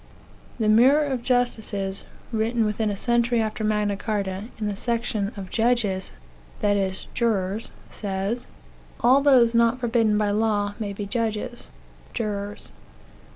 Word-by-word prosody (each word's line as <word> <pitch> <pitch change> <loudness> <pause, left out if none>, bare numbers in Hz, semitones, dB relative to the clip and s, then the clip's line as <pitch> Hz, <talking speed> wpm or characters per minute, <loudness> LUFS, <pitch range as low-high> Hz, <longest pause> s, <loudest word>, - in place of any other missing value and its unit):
The 220 - +1
Mirror 260 +8 +5
of 255 -2 -1
Justices, 220 -6 -1 0.3
(written 225 0 +1
within 210 +1 0
a 200 - -3
century 235 +1 +2
after 220 0 -2
Magna 210 -1 +1
Carta,) 200 -2 -3
in 215 - -3
the 205 -1 -1
section 220 -2 -1
" - - -18
Of 190 -2 -7
Judges" 225 -5 +1 0.5
that 205 -2 +2
is, 190 -1 -1
jurors 215 -2 0 0.2
says: 200 +4 -3 0.5
"All 255 +4 +5
those 255 -5 +5
who 230 - +3
are - - +6
not 230 +2 +1
forbidden 225 -3 +2
by 210 -1 +1
law 205 -1 +1
may 205 -2 -3
be 200 +1 -5
judges 225 +2 -3 0.5
(jurors). 205 -2 -4
215 Hz, 150 wpm, -24 LUFS, 205-235 Hz, 0.5 s, are